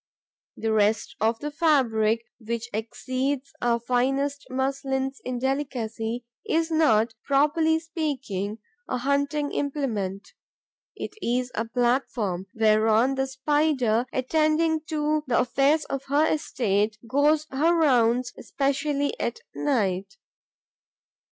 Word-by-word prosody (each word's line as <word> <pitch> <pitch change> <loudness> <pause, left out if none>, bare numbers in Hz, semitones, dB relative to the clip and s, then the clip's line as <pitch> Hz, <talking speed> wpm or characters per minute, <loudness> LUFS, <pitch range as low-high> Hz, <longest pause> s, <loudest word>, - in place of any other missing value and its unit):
The 225 -1 -1
rest 215 +1 +1
of 225 +1 +2
the 295 +5 -5
fabric, 235 -8 +2
which 235 +1 -4
exceeds 255 +5 -3
our 235 -1 +2
finest 270 +4 0
muslins 265 0 -2
in 255 -1 -3
delicacy, 240 -3 -2 0.2
is 325 0 0
not, 235 -8 +3
properly 310 +3 +3
speaking, 270 - -3 0.3
a 255 - 0
hunting 285 +3 0
implement: 225 -10 -2 0.7
it - - -6
is 250 -1 0
a 225 - -1
platform 230 -6 0
whereon 220 +3 +3
the 265 0 -1
Spider, 265 -4 +1
attending 310 +4 +1
to 305 -1 0
the 240 - +2
affairs 280 +5 +2
of 275 0 -4
her 285 +3 +3
estate, 215 -9 0
goes 295 +4 +3
her 315 +6 +3
rounds, 245 -5 +3
especially 285 +2 -1
at 465 - -2
night. 195 -8 -1
265 Hz, 110 wpm, -25 LUFS, 225-290 Hz, 0.7 s, not